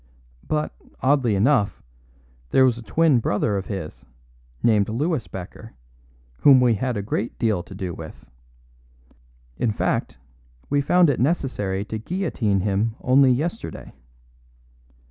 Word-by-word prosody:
But, 150 0 -1 0.3
oddly 130 -5 +2
enough, 105 0 +1 0.7
there 130 - +5
was 120 -2 +1
a - - -8
twin 140 +5 +2
brother 105 -1 0
of 95 -1 -3
his, 95 -7 -6 0.6
named 105 -3 +3
Louis 145 +3 -1
Becker, 95 +4 -9 0.6
whom 135 -2 +7
we 125 -2 +4
had 125 +2 -2
a 100 - -3
great 105 +2 -3
deal 110 -6 0
to 95 - -12
do 95 -3 -4
with. 80 -1 -10 1.3
In 115 - 0
fact, 105 - -2 0.5
we 145 0 +3
found 175 +2 +4
it 130 - -3
necessary 115 - -1
to 110 +1 -5
guillotine 115 - -1
him 105 +3 0
only 130 +1 +5
yesterday. 165 - -3
115 Hz, 130 wpm, -23 LUFS, 100-140 Hz, 1.3 s, whom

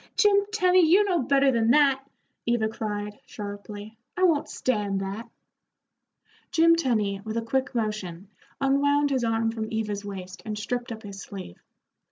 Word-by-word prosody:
"Jim 405 -2 +4
Tenny, 370 -4 +4
you 360 +6 +6
know 365 -6 +1
better 275 +1 +3
than 230 -2 +2
that," 275 0 +4 0.4
Eva 235 -2 +2
cried, 210 -1 -4
sharply. 205 +1 -8 0.2
"I 370 - +1
won't 325 -5 +3
stand 205 -6 -1
that." 200 +4 -5 1.2
Jim 335 0 +5
Tenny, 215 -10 0
with 220 +1 -4
a 230 - -1
quick 265 +3 -1
motion, 210 -5 -3 0.3
unwound 285 +1 +2
his 260 -3 +1
arm 225 0 +1
from 220 -1 -5
Eva's 210 -2 -2
waist 190 -2 -7
and 215 -1 -4
stripped 240 +3 -3
up 220 -1 -7
his 200 -1 -8
sleeve. 190 - -9
225 Hz, 155 wpm, -26 LUFS, 205-280 Hz, 1.2 s, you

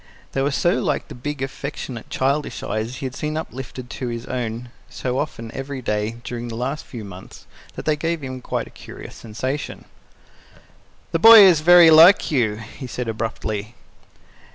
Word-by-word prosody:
They 135 - -1
were 140 - +1
so 145 -1 +1
like - - -2
the - - -8
big, 140 +2 -5
affectionate, 135 -3 -6
childish 140 +3 -1
eyes 110 +3 -3
he 135 - -6
had 130 - -4
seen 155 +2 -3
uplifted 130 -4 -7
to 125 - -5
his 115 0 -5
own 120 -1 -4 0.2
so 125 +1 -3
often 115 -6 -5
every 135 0 -5
day 105 -2 -2
during 120 -1 -5
the 115 - -6
last 130 +6 -3
few 115 -4 -8
months, 95 -1 -12 0.3
that - - -7
they 155 - +2
gave 165 +2 -2
him 130 -1 -5
a - - -17
quite - - -4
curious - - -11
sensation. 130 +6 -5 1.3
"The 165 - 0
boy 225 +3 +10
is 185 -5 +7
very 175 0 +8
like 165 +5 +7
you," 115 -7 +1
he 115 +5 -9
said 125 0 -5
abruptly. 110 -1 -4
130 Hz, 175 wpm, -22 LUFS, 115-150 Hz, 1.3 s, boy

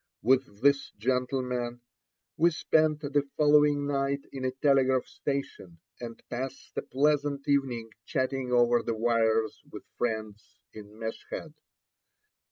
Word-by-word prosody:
With 130 -4 +2
this 140 -1 +4
gentleman 125 0 -1 0.5
we 170 +3 +4
spent 155 -1 +2
the 145 -1 0
following 150 -1 +4
night 140 0 -1
in 135 -1 -6
a - - +2
telegraph 130 -1 +2
station, 135 -11 -5 0.2
and 115 -1 -7
passed 130 +2 -5
a - - -1
pleasant 145 0 0
evening 125 -5 0 0.2
chatting 130 -1 -1
over 120 -1 +4
the 115 - -2
wires 115 -1 +1
with - - -8 0.2
friends 110 -2 -3 0.2
in 105 0 -12
Meshed. 115 +7 -6
130 Hz, 120 wpm, -29 LUFS, 115-140 Hz, 0.5 s, this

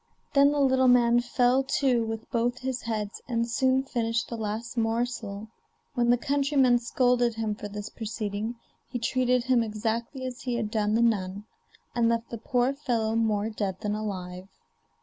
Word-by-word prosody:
Then 280 0 +6
the 295 - 0
little 260 -1 +4
man 240 -1 +5
fell 245 +1 +2 0.2
to 255 -4 +2
with 225 0 -5
both 240 +1 0
his 260 -1 -3
heads, 215 -3 -4
and 235 -2 0
soon 260 +2 +2
finished 230 -3 -1
the 235 - -4
last 220 +2 -4
morsel. 225 -2 -2 0.5
When 240 -3 +1
the 245 - +5
countryman 275 -2 +2
scolded 245 -1 +2
him 220 -1 -1
for 205 - -7
this 205 0 -6
proceeding 215 0 -4 0.3
he 250 - -3
treated 250 +1 +1
him 255 -1 +3
exactly 230 +4 -3
as 250 -1 -6
he 245 -2 -2
had 220 -3 -2
done 215 -1 +1
the 230 - +3
nun, 200 -3 0 0.5
and 230 -1 +2
left 230 0 -1
the 230 - -5
poor 250 +2 +1
fellow 230 -6 -1
more 220 -1 +1
dead 195 -3 -3
than 210 -1 -1
alive. 185 -3 -5
235 Hz, 170 wpm, -27 LUFS, 215-250 Hz, 0.5 s, Then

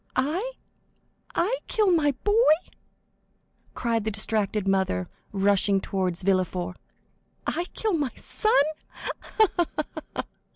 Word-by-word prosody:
"I?—I 370 - -3
kill 425 -4 +3
my 295 -5 +3
boy?" 415 - +2 1.4
cried 230 -2 0
the 220 - 0
distracted 210 -1 0
mother, 190 - +1 0.2
rushing 200 0 +3
toward 185 -3 -1
Villefort; 185 -1 0 0.7
"I 345 - -1
kill 435 -3 0
my 295 -5 +1
son? 430 -11 +4 0.2
Ha, - - -6 0.5
ha, 345 - +5 0.5
ha!" - - -1
220 Hz, 100 wpm, -26 LUFS, -, 1.4 s, ha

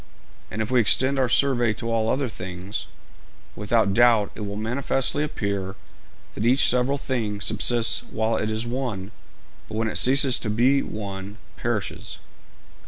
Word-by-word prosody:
And 110 +3 -2
if 110 - -6
we 125 -1 +5
extend 130 +6 +3
our 130 -2 +2
survey 120 -4 +3
to 115 +1 -5
all 110 -1 +1
other 135 +2 0
things, 90 -1 -6 0.7
without 105 -1 +1
doubt 115 -2 +4
it - - -11
will 100 -1 -4
manifestly 130 +6 -1
appear 100 -9 -3 0.6
that 105 - -4
each 125 +4 +4
several 125 +3 +2
thing 115 -7 -2
subsists 115 +2 +1
while 110 +1 0
it 110 - -1
is 110 +1 -2
one, 115 -6 -4 0.6
but - - -8
when 115 0 0
it - - -1
ceases 135 0 +4
to 110 - -4
be 125 +6 +3
one 100 0 -6 0.2
perishes.' 110 -2 -3
115 Hz, 155 wpm, -24 LUFS, 105-125 Hz, 0.7 s, we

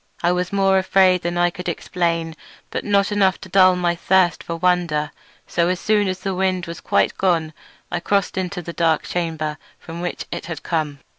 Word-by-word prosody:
I 175 - +3
was 180 0 -1
more 195 -1 +3
afraid 185 -1 +3
than 175 +1 -2
I 175 0 +3
could 180 +1 -5
explain, 165 -1 -2 0.4
but - - -3
not 200 0 +2
enough 195 -2 +2
to 190 - -10
dull 185 0 +5
my 175 -1 +1
thirst 180 -1 +2
for 170 - -4
wonder; 165 -4 +1 0.3
so 170 0 0
as 180 0 0
soon 210 -2 +2
as 185 0 -3
the 195 0 -2
wind 185 -1 0
was 170 -1 -8
quite - - +1
gone 165 -4 +1 0.4
I 175 - -1
crossed 200 +2 0
into 185 -1 -3
the 170 - -7
dark 165 -2 +1
chamber 160 -3 -3 0.2
from 170 0 -8
which 175 - -4
it - - -5
had 170 -3 -6
come. 150 -4 -2
175 Hz, 200 wpm, -21 LUFS, 170-190 Hz, 0.4 s, dull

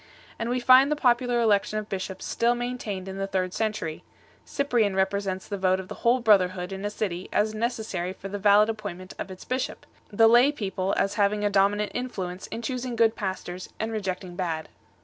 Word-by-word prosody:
And 230 - -2
we 250 +1 0
find 255 +3 +6
the - - +3
popular 245 -3 +2
election 215 -2 +2
of 215 -1 -4
bishops 190 -1 -5
still 235 +1 +1
main 245 +1 -3
tained 195 -4 -5
in 190 0 -6
the 195 - -1
third 185 -2 -1
century; 215 -8 -2 0.4
Cyprian 240 -8 +1
8 - - -5
represents 190 0 -1
the 200 -2 -4
vote 185 0 +2
of 190 - -8
the - - -5
whole 245 +2 +3
brotherhood 185 -4 +3
in 195 +1 -6
a 205 - -1
city 190 -4 -4
as 215 +1 +1
necessary 215 -6 -2
for 195 +1 -8
the 200 +1 -5
valid 205 +1 +5
appointment 205 -5 -6
of - - -4
its 185 -1 -10
bishop, 255 +1 -3 0.3
the 225 +2 +5
lay 240 +5 +6
people 195 -7 -2
as 195 - +1
having 205 +1 +2
a 205 - +1
dominant 205 +1 +2
influence 190 -8 -4
in 230 - -6
choosing 250 0 -3
good 225 -1 +3
pastors 185 -2 -5
and 220 +1 -2
reject 195 -4 -3
ing 180 -1 -9
bad. 165 -3 -3
205 Hz, 210 wpm, -26 LUFS, 190-230 Hz, 0.4 s, find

